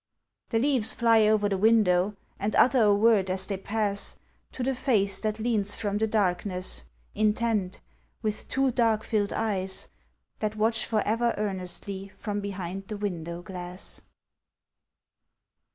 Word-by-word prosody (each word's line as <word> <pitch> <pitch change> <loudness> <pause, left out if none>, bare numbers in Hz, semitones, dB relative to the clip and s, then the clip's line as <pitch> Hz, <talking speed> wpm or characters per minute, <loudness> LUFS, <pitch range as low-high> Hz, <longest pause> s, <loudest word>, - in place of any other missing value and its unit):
The 225 - +1
leaves 245 -2 +4
fly 225 -2 +4
over 210 -1 +3
the 195 -2 -1
window 205 -3 +3 0.2
and 210 +2 -1
utter 255 -1 +5
a 205 -2 +5
word 205 -3 +3
as 190 +1 +1
they 195 - -3
pass 200 0 0 0.4
To 255 - -4
the 265 +2 0
face 210 -7 +1
that 215 -1 -2
leans 215 -3 +1
from 205 -1 -2
the 220 - +1
darkness, 185 - -1 0.3
intent, 215 -3 0 0.4
with 215 -1 -2
two 270 -1 +1
dark 225 -3 +1
filled 205 -2 0
eyes 195 -4 -2 0.5
That 215 0 -2
watch 220 +1 +1
for 215 -2 +1
ever 230 +2 +1
earnestly 195 -1 -3
from 205 +1 -5
behind 195 -1 -5
the 210 - -5
window 175 -4 -4
glass. 180 0 -7
210 Hz, 140 wpm, -27 LUFS, 195-225 Hz, 0.5 s, utter